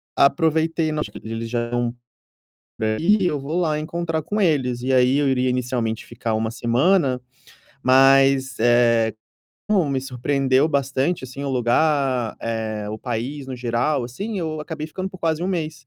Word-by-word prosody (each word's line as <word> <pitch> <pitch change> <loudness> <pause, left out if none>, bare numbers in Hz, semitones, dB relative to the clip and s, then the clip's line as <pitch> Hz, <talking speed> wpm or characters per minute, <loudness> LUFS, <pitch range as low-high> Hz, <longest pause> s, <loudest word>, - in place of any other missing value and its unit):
Aproveitei, 160 +2 +2
no 155 - -2
acho - - -5
que - - -10
eles 115 +1 -5
já 120 - -1
eram 120 0 -2 0.9
eh, 110 0 0
e 200 +2 +3
eu 150 -4 0
vou 150 +6 -3
lá 155 -3 0
encontrar 165 0 -3
com 210 +8 -2
eles, 130 -9 +1
e 130 +1 0
aí 130 +2 +4
eu 145 -2 +2
iria 130 -1 +1
inicialmente 125 -3 -2
ficar 115 -1 -3
1 110 0 -1
semana, 130 +4 +2 0.6
mas, 135 0 +4
eh, 115 -1 +3 0.5
como 190 -8 +2
me 135 -1 0
surpreendeu 135 +2 +1
bastante 140 +1 0
assim 130 +2 -8
o - - -2
lugar, 130 -1 +1
eh, 110 -2 -3
o 110 - -4
país 130 +4 -4
no 130 - -5
geral, 120 +3 0
assim, 195 - -5
eu 155 -3 -3
acabei 155 -1 -5
ficando 185 +4 -5
por 190 -1 -12
quase 165 -1 -1
1 - - -1
mês. 155 -7 -4
135 Hz, 170 wpm, -22 LUFS, 120-155 Hz, 0.9 s, aí